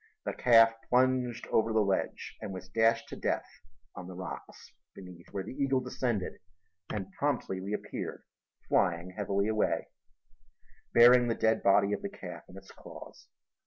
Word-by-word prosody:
The - - -2
calf 115 -2 +6 0.2
plunged 125 -1 +2
over 115 0 +2
the 110 - +2
ledge 100 -2 -2
and - - -5
was 95 -1 -8
dashed 115 +3 +2
to - - -6
death - - -1 0.5
on 90 - -8
the 90 - -9
rocks 90 -2 -9 0.2
beneath, 90 -3 -12
where 95 - -3
the 100 - -8
eagle 135 -1 +1
descended 125 -5 -3 0.5
and 95 -2 -4
promptly 125 -7 -2
reappeared 100 +3 -5 0.4
flying 85 0 +1
heavily 100 +1 -1
away, 110 -1 0 1.0
bearing 120 +1 +7
the 115 - 0
dead 110 0 +2
body 100 +1 +4
of - - -2
the 200 - -4
calf 90 - -9
in 90 - -12
its 95 0 -13
claws. - - -13
105 Hz, 155 wpm, -30 LUFS, 95-120 Hz, 1.0 s, bearing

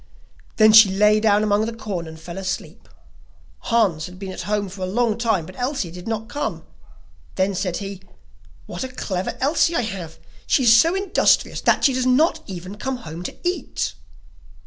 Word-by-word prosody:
Then 215 -1 +6
she 220 -2 +9
lay 210 +2 +4
down 210 -1 +3
among 210 +1 +1
the 230 - -5
corn 195 -7 -5
and 160 0 -10
fell 170 +3 -8
asleep. 190 -1 -6 0.7
Hans 195 -9 +1
had 180 0 -12
been 195 0 -6
at - - -6
home 210 -1 0
for 190 +1 -10
a 185 - -1
long 225 +3 +1
time, 220 -7 0
but 185 - -12
Elsie 250 - -2
did 180 +3 -10
not 225 0 -3
come; 290 +3 -4 0.7
then 190 +1 +1
said 185 -2 -2
he: 195 -2 -7 0.6
'What - - -6
a - - -3
clever 190 -7 -4
Elsie 320 +4 +2
I - - +2
have; 185 -7 -6 0.3
she 265 - +3
is 230 -2 +7
so 330 +10 +4
industrious 390 -1 +2
that - - +2
she 270 - +4
does 255 0 0
not 310 +6 +3
even 185 +1 -8
come 265 +4 -3
home 160 +2 -7
to 180 - -6
eat. 360 - -2
210 Hz, 190 wpm, -22 LUFS, 185-240 Hz, 0.7 s, she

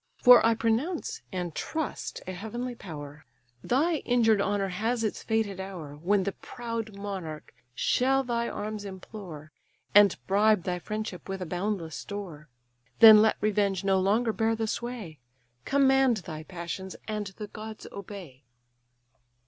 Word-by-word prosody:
For 245 -1 +8
I 230 0 +4
pronounce 230 +10 -1
(and 180 -3 -3
trust 315 - -4
a 185 - -4
heavenly 225 +7 -5
power) 150 -8 -9 0.4
Thy 310 +7 +2
injured 225 -6 +3
honour 200 -1 0
has 225 +6 -1
its 215 - -2
fated 220 -4 -1
hour, 180 -7 -7
When 190 +6 +1
the 200 - -1
proud 230 -1 -6
monarch 190 -7 -6 0.2
shall 270 - +2
thy 235 -2 -1
arms 210 0 -4
implore, 185 -5 -9 0.4
And 205 -2 +7
bribe 205 -1 +3
thy 180 -1 -2
friendship 215 0 -5
with 195 0 -3
a 185 - -4
boundless 175 -2 -3
store. 175 -8 -7 0.5
Then 220 -2 +10
let 220 0 +3
revenge 200 -2 +1
no 195 -1 +3
longer 215 +4 +2
bear 225 +1 +1
the 225 0 -1
sway; 220 - -5 0.5
Command 270 -3 +4
thy 155 -2 -6
passions, 180 +2 -6
and 210 -2 -3
the 210 - -5
gods 215 +1 -9
obey." 190 -9 -9
205 Hz, 140 wpm, -28 LUFS, 185-225 Hz, 0.5 s, Then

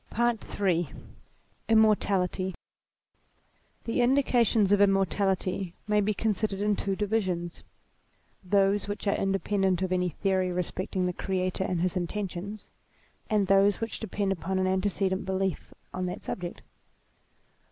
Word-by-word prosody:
PAET 235 -2 -1
III 175 -6 +1 0.8
IMMOETALITY 200 -4 +2 1.3
HP - - -35
HE 230 +2 0
indications 240 -5 +3
of 205 0 +4
immortality 195 -2 +1
may 210 0 +3
be 210 +1 +1
considered 210 -2 -1
in 205 0 +2
two 195 -1 -2
divisions: 190 -5 -1 0.8
those 200 +1 +2
which 205 +1 -5
are 200 - +2
independent 195 -1 0
of 185 - -2
any 180 -1 +1
theory 185 +2 0
respecting 180 +1 -2
the 180 - -1
Creator 185 0 -1
and 180 -3 -1
his 180 0 0
intentions, 195 +2 -4 0.6
and 210 -2 +2
those 195 +1 +4
which 225 0 -4
depend 200 -2 -2
upon 190 +1 -2
an 185 - +1
antecedent 190 0 0
belief 190 -1 -2 0.2
on 185 0 -2
that 180 - -6
subject. 175 -2 -5
195 Hz, 130 wpm, -28 LUFS, 185-205 Hz, 1.3 s, of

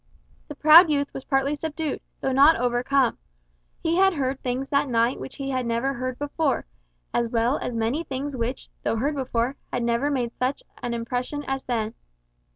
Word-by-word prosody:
The 295 - -8
proud 310 +4 +8
youth 285 -1 0
was 270 - -7
partly 270 +1 +1
subdued, 310 -1 -3 0.2
though 265 - 0
not 280 +5 +6
overcome. 245 +1 +1 0.6
He 330 +1 +1
had 385 -1 +4
heard 270 -2 -1
things 255 +2 -2
that 280 -1 +1
night 235 +1 +2
which 265 - -7
he 275 -1 -4
had 255 -1 0
never 235 +3 0
heard 255 0 -4
before, 290 +1 -1 0.5
as 235 -1 +1
well 235 +3 +1
as 240 - -4
many 230 +8 0
things 280 -1 -4
which, 245 +2 -3
though - - 0
heard 275 +7 0
before, 260 -1 -1
had 245 - -1
never 235 +4 +1
made 250 -5 -1
such 255 +2 -1 0.2
an 240 -1 -2
impression 250 +5 -3
as 270 0 -1
then. 225 -3 -1
265 Hz, 180 wpm, -25 LUFS, 240-285 Hz, 0.6 s, proud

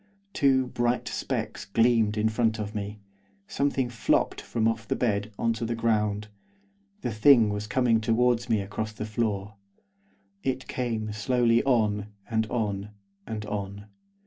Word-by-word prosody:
Two 135 -2 +3
bright 120 -1 -1
specks - - -3
gleamed 115 0 +3
in 110 +1 +2
front 110 0 +1
of 105 -1 -4
me; 105 0 -5 0.4
something 140 0 0
flopped 120 -3 +1
from 110 -1 0
off 115 0 -1
the - - 0
bed 105 -3 0
on 115 0 +1
to 115 +1 -5
the 115 +1 -1
ground; 105 -2 0 0.7
the 120 - -2
thing 110 -1 +6
was 105 0 -4
coming 115 0 +2
towards 120 +2 +2
me 110 -3 +2
across 105 +2 -4
the 110 - -5
floor. 105 -2 -2 0.8
It 130 0 -2
came 110 -4 -2
slowly 115 +2 +2
on, 105 -5 +2 0.2
and 110 -1 0
on, 105 -4 -2 0.4
and 110 -1 -4
on. 100 -1 -5
110 Hz, 145 wpm, -27 LUFS, 105-120 Hz, 0.8 s, thing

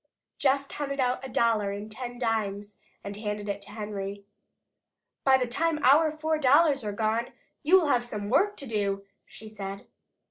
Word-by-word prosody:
Jess 275 0 +2
counted 275 0 -4
out 255 0 +1
a 265 - -6
dollar 225 -4 +2
in 205 +1 -5
ten 245 +3 -7
dimes 210 -4 -2 0.3
and 200 0 -6
handed 210 -1 -4
it 200 0 -3
to 200 - -10
Henry. 205 -2 -5 1.0
"By 265 -1 +6
the 255 - 0
time 315 +6 0
our 300 +5 +6
four 310 0 -1
dollars 280 0 +4
are 210 - -2
gone, 220 +3 -1 0.3
you 360 +6 +6
will 330 - 0
have 245 -3 +3
some 210 -4 -5
work 385 - +2
to 280 - -4
do," 200 -4 -1 0.2
she 220 - -12
said. 200 -2 -7
230 Hz, 175 wpm, -28 LUFS, 205-275 Hz, 1.0 s, By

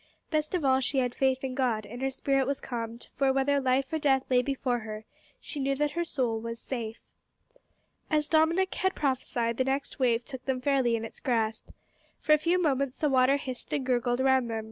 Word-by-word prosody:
Best 305 +2 0
of 335 -5 -1
all, 260 0 +4
she 270 +1 -2
had 250 -2 +1
faith 265 0 +1
in 260 -1 -2
God, 245 -5 0
and 240 +5 -8
her 270 - +1
spirit 270 0 0
was 280 0 -1
calmed, 230 -1 -5
for, 270 -1 +3
whether 270 +1 +2
life 265 +2 +1
or 315 - +1
death 270 -3 +3
lay 250 -1 +5
before 255 -2 -1
her, 215 -1 -7 0.3
she 295 - -7
knew 275 0 0
that 295 +1 0
her 345 - -1
soul 245 -8 -1
was 230 +1 -6
"safe." 230 -4 -5 1.1
As 300 -2 +2
Dominick 335 +4 +3
had 375 0 0
prophesied, 245 -4 -1
the 260 - +2
next 270 +2 -2
wave 240 -2 +2
took 260 -2 -8
them 265 -2 0
fairly 255 -3 +2
in 225 0 -3
its - - -10
grasp. 225 -4 -1 0.5
For - - -1
a 305 - +5
few 345 +4 +2
moments 275 -5 0
the 300 - +1
water 260 +1 +4
hissed 255 -3 -7
and 275 -3 -1
gurgled 245 -1 +1
round 260 -2 +3
them. 225 -1 -2
265 Hz, 210 wpm, -28 LUFS, 245-280 Hz, 1.1 s, lay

